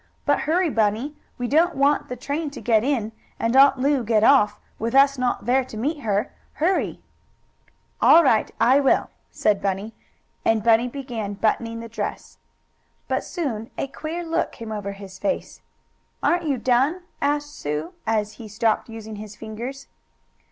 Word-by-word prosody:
But 285 Hz, -1 st, +3 dB
hurry, 345 Hz, 0 st, +2 dB
Bunny. 225 Hz, +7 st, 0 dB, 0.2 s
We 245 Hz, -, -2 dB
don't 330 Hz, +6 st, +3 dB
want 280 Hz, +2 st, +2 dB
the 250 Hz, -, -3 dB
train 285 Hz, +5 st, -3 dB
to -, -, -5 dB
get 225 Hz, -2 st, +2 dB
in, 240 Hz, -5 st, 0 dB, 0.3 s
and 230 Hz, +2 st, 0 dB
Aunt 275 Hz, 0 st, +7 dB
Lu 275 Hz, 0 st, +1 dB
get 220 Hz, -1 st, +2 dB
off, 210 Hz, -6 st, +5 dB, 0.2 s
with 230 Hz, +3 st, -2 dB
us 275 Hz, 0 st, +6 dB
not 250 Hz, -1 st, -1 dB
there 260 Hz, +2 st, +3 dB
to 225 Hz, -, -9 dB
meet 290 Hz, +7 st, -1 dB
her. 210 Hz, 0 st, -1 dB, 0.2 s
Hurry!" 355 Hz, +5 st, 0 dB, 1.0 s
"All 335 Hz, -, +8 dB
right 225 Hz, -7 st, +3 dB
I 250 Hz, +5 st, +5 dB
will," 270 Hz, -2 st, +2 dB, 0.3 s
and 205 Hz, +2 st, -1 dB
Bunny 230 Hz, +1 st, +5 dB
began 235 Hz, -6 st, -5 dB
buttoning 230 Hz, +2 st, -1 dB
the 230 Hz, -, -7 dB
dress. 230 Hz, -, -6 dB, 0.7 s
But -, -, -1 dB
soon 240 Hz, -, -4 dB
a -, -, -1 dB
queer 315 Hz, +5 st, -5 dB
look 330 Hz, 0 st, -1 dB
came 230 Hz, -2 st, -8 dB
over 205 Hz, -2 st, -4 dB
his 195 Hz, -1 st, -11 dB
face. 285 Hz, -, -3 dB, 0.6 s
"Aren't 345 Hz, -1 st, +2 dB
you 275 Hz, -3 st, +1 dB
done?" 260 Hz, +9 st, +2 dB, 0.2 s
asked 290 Hz, +1 st, 0 dB
Sue, 150 Hz, +3 st, -4 dB
as 215 Hz, -1 st, 0 dB
he 220 Hz, -, -8 dB
stopped 220 Hz, +2 st, 0 dB
using 220 Hz, -1 st, -8 dB
his 210 Hz, 0 st, -9 dB
fingers. 230 Hz, +6 st, -7 dB
240 Hz, 160 wpm, -23 LUFS, 215-280 Hz, 1.0 s, All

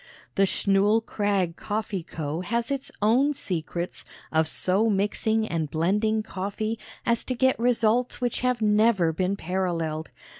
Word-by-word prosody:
The 195 Hz, 0 st, +3 dB
Schnull 205 Hz, +4 st, +2 dB
Krag 195 Hz, -5 st, 0 dB
Coffee 210 Hz, -2 st, -3 dB
Co. 160 Hz, 0 st, -4 dB
has 235 Hz, +7 st, -1 dB
its 275 Hz, -1 st, -3 dB
own 255 Hz, +7 st, +4 dB
secrets 175 Hz, -3 st, -3 dB, 0.3 s
of 160 Hz, 0 st, +3 dB
so 195 Hz, +7 st, +2 dB
mixing 220 Hz, +2 st, +1 dB
and 160 Hz, -5 st, -2 dB
blending 210 Hz, +7 st, +1 dB
coffee 215 Hz, +3 st, -3 dB, 0.3 s
as 235 Hz, -2 st, +2 dB
to 255 Hz, -, -2 dB
get 260 Hz, +1 st, +2 dB
results 240 Hz, 0 st, +2 dB
which 245 Hz, -1 st, -1 dB
have 250 Hz, -3 st, 0 dB
never 210 Hz, -5 st, +3 dB
been 185 Hz, +4 st, 0 dB
paralleled. 165 Hz, -4 st, -2 dB
205 Hz, 140 wpm, -26 LUFS, 180-225 Hz, 0.3 s, own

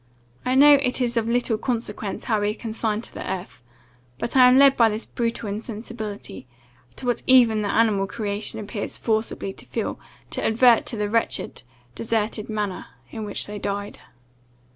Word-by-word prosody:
I 255 Hz, -, 0 dB
know 290 Hz, +2 st, +8 dB
it 250 Hz, -1 st, 0 dB
is 245 Hz, -1 st, 0 dB
of 230 Hz, -1 st, 0 dB
little 235 Hz, -2 st, +1 dB
consequence 230 Hz, -4 st, -3 dB
how 220 Hz, -3 st, 0 dB
we 205 Hz, -, +1 dB
are -, -, -1 dB
consigned 220 Hz, -1 st, -2 dB
to -, -, -9 dB
the -, -, -5 dB
earth; 185 Hz, -9 st, -6 dB, 0.6 s
but 235 Hz, -, -4 dB
I 255 Hz, -1 st, +8 dB
am 250 Hz, +1 st, +6 dB
led 275 Hz, 0 st, +7 dB
by 230 Hz, -2 st, +5 dB
this 215 Hz, +1 st, -4 dB
brutal 230 Hz, -2 st, -3 dB
insensibility, 215 Hz, -, -6 dB, 0.5 s
to -, -, -4 dB
what 245 Hz, -1 st, 0 dB
even 235 Hz, -4 st, +6 dB
the 205 Hz, -, -2 dB
animal 205 Hz, -4 st, +2 dB
creation 210 Hz, 0 st, -3 dB
appears 205 Hz, 0 st, -5 dB
forcibly 220 Hz, -3 st, -2 dB
to -, -, -11 dB
feel, -, -, -3 dB, 0.3 s
to -, -, -1 dB
advert 235 Hz, +1 st, +4 dB
to 230 Hz, -, -1 dB
the 210 Hz, 0 st, -1 dB
wretched, 230 Hz, +2 st, -1 dB, 0.3 s
deserted 220 Hz, -, -2 dB
manner 210 Hz, -3 st, -3 dB, 0.2 s
in 220 Hz, -2 st, -5 dB
which 205 Hz, -, -3 dB
they 210 Hz, 0 st, -7 dB
died." 200 Hz, 0 st, -4 dB
220 Hz, 175 wpm, -23 LUFS, 210-235 Hz, 0.6 s, know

